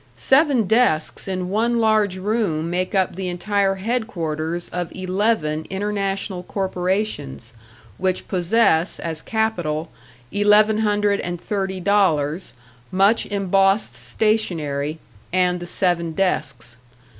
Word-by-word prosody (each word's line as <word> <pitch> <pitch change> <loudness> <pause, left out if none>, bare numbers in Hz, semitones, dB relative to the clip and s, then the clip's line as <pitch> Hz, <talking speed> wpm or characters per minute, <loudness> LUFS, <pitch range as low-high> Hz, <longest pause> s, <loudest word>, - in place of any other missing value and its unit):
Seven 265 - +3
desks 210 -8 +1
in 185 -1 -3
one 230 +4 +1
large 215 -4 +2
room 185 -6 -1
make 185 +3 -1
up 190 -3 +1
the 190 0 -4
entire 195 +2 0
headquarters 175 -7 -3
of 175 -2 -4
eleven 185 -5 0
international 195 -1 -2
corporations, 180 - -2 0.5
which 185 -1 -1
possess, 185 -2 +2
as 160 -2 -2
capital, 175 -8 -1 0.4
eleven 210 +1 +4
hundred 205 -1 +1
and 175 0 -4
thirty 190 -1 -3
dollars, 180 -4 +1 0.4
much 200 +4 +3
embossed 195 +1 +2
stationery 160 -9 -1 0.3
and 180 0 +2
the 175 - -7
seven 175 -2 0
desks. 135 -10 -2
190 Hz, 110 wpm, -21 LUFS, 170-210 Hz, 0.5 s, eleven